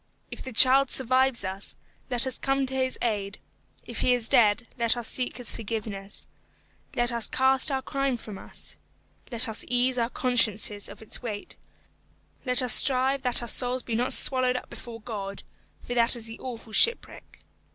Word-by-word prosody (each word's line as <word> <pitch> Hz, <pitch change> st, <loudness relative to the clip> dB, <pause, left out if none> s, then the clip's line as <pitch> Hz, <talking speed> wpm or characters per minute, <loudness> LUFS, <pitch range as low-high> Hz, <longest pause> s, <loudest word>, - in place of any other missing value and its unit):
If -, -, -8 dB
the 260 Hz, -, -8 dB
child 260 Hz, +3 st, +5 dB
survives 260 Hz, -2 st, +1 dB
us, 190 Hz, +1 st, -7 dB, 0.3 s
let 245 Hz, 0 st, +1 dB
us 260 Hz, -2 st, -4 dB
come 270 Hz, 0 st, -1 dB
to 265 Hz, -, -7 dB
his 260 Hz, -1 st, -2 dB
aid; 205 Hz, -4 st, -3 dB, 0.5 s
if -, -, -8 dB
he 250 Hz, -, +2 dB
is 235 Hz, -2 st, -5 dB
dead, 225 Hz, +1 st, +2 dB
let 235 Hz, -1 st, 0 dB
us 235 Hz, -2 st, -5 dB
seek 250 Hz, -1 st, -2 dB
his 245 Hz, -3 st, -8 dB
forgiveness. 210 Hz, -3 st, -6 dB, 0.7 s
Let 240 Hz, 0 st, -1 dB
us 235 Hz, -1 st, -1 dB
cast 265 Hz, +2 st, +3 dB
our 265 Hz, -1 st, -3 dB
crime 275 Hz, -2 st, -2 dB
from 210 Hz, -4 st, -10 dB
us. -, -, -9 dB, 0.5 s
Let 235 Hz, +1 st, +3 dB
us 220 Hz, -1 st, -4 dB
ease 250 Hz, +1 st, 0 dB
our 230 Hz, 0 st, -1 dB
consciences 220 Hz, -5 st, +1 dB
of -, -, -12 dB
its 220 Hz, -, -3 dB
weight. 215 Hz, -5 st, -7 dB, 0.9 s
Let 250 Hz, 0 st, +4 dB
us 250 Hz, -, +5 dB
strive 265 Hz, +1 st, +4 dB
that 250 Hz, -2 st, 0 dB
our -, -, -6 dB
souls 250 Hz, +2 st, +2 dB
be 235 Hz, -, -6 dB
not 245 Hz, +3 st, -1 dB
swallowed 255 Hz, -1 st, +6 dB
up -, -, -10 dB
before 230 Hz, -1 st, -11 dB
God, 200 Hz, -3 st, -7 dB, 0.4 s
for 245 Hz, -, -6 dB
that 235 Hz, 0 st, +4 dB
is 235 Hz, -2 st, -3 dB
the 225 Hz, 0 st, -9 dB
awful 235 Hz, -3 st, -9 dB
shipwreck. 465 Hz, -, 0 dB
245 Hz, 180 wpm, -25 LUFS, 225-260 Hz, 0.9 s, swallowed